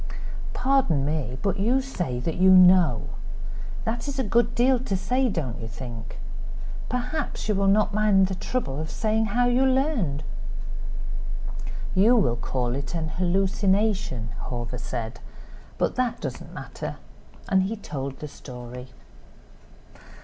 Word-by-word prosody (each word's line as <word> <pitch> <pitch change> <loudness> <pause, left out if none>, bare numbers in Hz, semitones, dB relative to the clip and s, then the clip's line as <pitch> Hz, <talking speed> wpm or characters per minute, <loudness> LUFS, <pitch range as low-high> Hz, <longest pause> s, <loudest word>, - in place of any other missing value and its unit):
"Pardon 250 - +3
me. 145 -4 -1
But 195 0 +1
you 240 +7 +3
say 180 - -2
that 165 +5 -2
you 190 +1 +6
know. 180 - +7 0.8
That 230 +3 -2
is 280 -1 -3
a 265 - +1
good 235 +2 +2
deal 250 +1 +4
to 205 -6 -1
say, 255 +6 +1
don't 135 - -3
you 115 - -5
think? 115 0 -7 0.7
Perhaps 250 +3 -2
you 215 - +3
will 195 0 +2
not 210 +1 +4
mind 205 -2 +5
the 190 - -2
trouble 185 - -2
of 155 - -4
saying 220 +3 +1
how 240 +4 +2
you 245 +2 +4
learned." 260 - +2 1.7
"You 215 +6 +6
will 125 - +3
call 120 0 -1
it 140 +5 -3
an 160 -2 -1
hallucination," 190 - +1 0.2
Hawver 120 0 -4
said, 120 -1 -4 0.6
"but - - +1
that 250 -2 +1
does - - -4
not - - -11
matter." - - -5 0.5
And 190 0 +4
he 195 +4 0
told 140 -9 -5
the 150 - -3
story. 125 -2 -8
190 Hz, 140 wpm, -26 LUFS, 140-230 Hz, 1.7 s, know